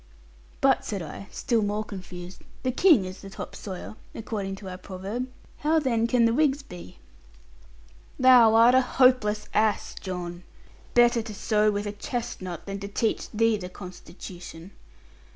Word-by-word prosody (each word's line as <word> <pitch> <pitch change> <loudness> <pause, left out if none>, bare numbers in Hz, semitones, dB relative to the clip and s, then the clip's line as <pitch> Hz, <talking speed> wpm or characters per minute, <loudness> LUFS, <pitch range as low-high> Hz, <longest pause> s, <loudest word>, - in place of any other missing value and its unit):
'But,' - - +4
said 195 -4 -4
I, 165 +5 -8
still 235 -3 0
more 210 +1 -1
confused, 180 -3 -9 0.2
'"The 255 - +1
King 275 - +5
is 185 +1 -8
the 195 - -9
top - - -8
sawyer," 190 +1 -7 0.2
according 200 -3 -4
to 195 0 -10
our 185 0 -7
proverb. 200 +7 -5 0.3
How 310 +2 +2
then 235 -6 +1
can 235 -1 +3
the 230 - +3
Whigs 285 0 +2
be?' 175 - -11 1.2
'Thou 245 -4 +7
art 230 +2 +7
a 260 - +6
hopeless 250 -5 +3
ass, 215 -1 +1
John. 175 -2 -6 0.5
Better 240 -1 +5
to 220 -2 -8
sew 215 0 +2
with 205 0 -2
a 205 - -2
chestnut 205 -5 -5
than 195 0 -5
to 200 - -5
teach 215 +2 -1
thee 225 0 +2
the 180 -3 -7
constitution. 180 -1 -10
210 Hz, 155 wpm, -26 LUFS, 185-235 Hz, 1.2 s, Thou